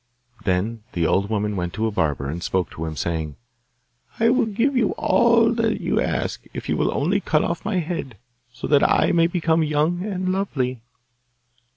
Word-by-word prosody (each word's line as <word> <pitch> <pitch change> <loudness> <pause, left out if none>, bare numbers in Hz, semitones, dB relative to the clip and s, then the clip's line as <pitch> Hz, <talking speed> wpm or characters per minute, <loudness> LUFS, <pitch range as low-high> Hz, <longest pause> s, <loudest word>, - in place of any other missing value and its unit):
Then 105 +5 0
the 85 -2 0
old 100 +4 +1
woman 105 -1 -1
went 90 -2 -3
to 110 - -1
a 110 - 0
barber, 75 -8 -1
and 80 +5 -4
spoke 90 -1 -1
to 80 - -5
him, 80 -1 -5
saying, 80 -1 -3 0.8
'I 230 0 +4
will 245 0 +3
give 235 +7 0
you 230 -5 +2
all 235 -1 +3
you 225 0 0
ask - - -2
if - - -5
you - - +1
will - - +1
only - - +1
cut - - +1
off - - -2
my 215 -4 -1
head, 160 - -3 0.3
so 125 - -7
that 145 -1 +4
I - - +3
may 165 -1 +4
become 165 -2 +1
young 155 +3 +1
and 185 -3 -2
lovely. 130 - -2
140 Hz, 185 wpm, -23 LUFS, -, 0.8 s, I